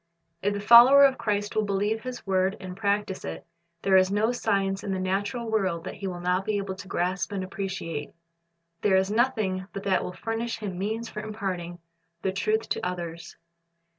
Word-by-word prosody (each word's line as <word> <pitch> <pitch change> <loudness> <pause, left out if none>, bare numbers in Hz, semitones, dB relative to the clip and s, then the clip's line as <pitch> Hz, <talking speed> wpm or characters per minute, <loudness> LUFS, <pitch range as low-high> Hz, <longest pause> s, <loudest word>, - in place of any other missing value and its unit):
If 205 +1 0
the - - -2
follower 240 +6 +9
of 265 -1 +2
Christ 205 -1 -1
will 215 - +3
believe 205 +2 0
His 255 0 -7
word 190 0 +1
and 185 -2 -7
practise 200 -1 -1
it, 80 0 -6 0.4
there 190 -1 +5
is 185 0 +4
no 215 +3 +2
science 195 -5 0
in 200 - -3
the 190 - -2
natural 200 +5 -1
world 190 -6 0
that - - -5
he 195 -1 -5
will 180 -2 -5
not 180 +2 0
be 210 +1 -1
able 195 -1 -3
to 190 +1 -10
grasp 185 +2 -1
and 195 -2 -2
appreciate. 185 -5 -4 0.7
There 200 -2 +3
is 190 +1 +1
nothing 215 -6 0
but 195 - -5
that 190 -2 +1
will - - -4
furnish 225 +5 -3
him 200 -4 -5
means 220 +4 -2
for 210 - -7
imparting 190 -5 -4 0.5
the 190 - +1
truth 215 +3 0
to - - -2
others. 170 -2 -5
195 Hz, 195 wpm, -27 LUFS, 185-215 Hz, 0.7 s, follower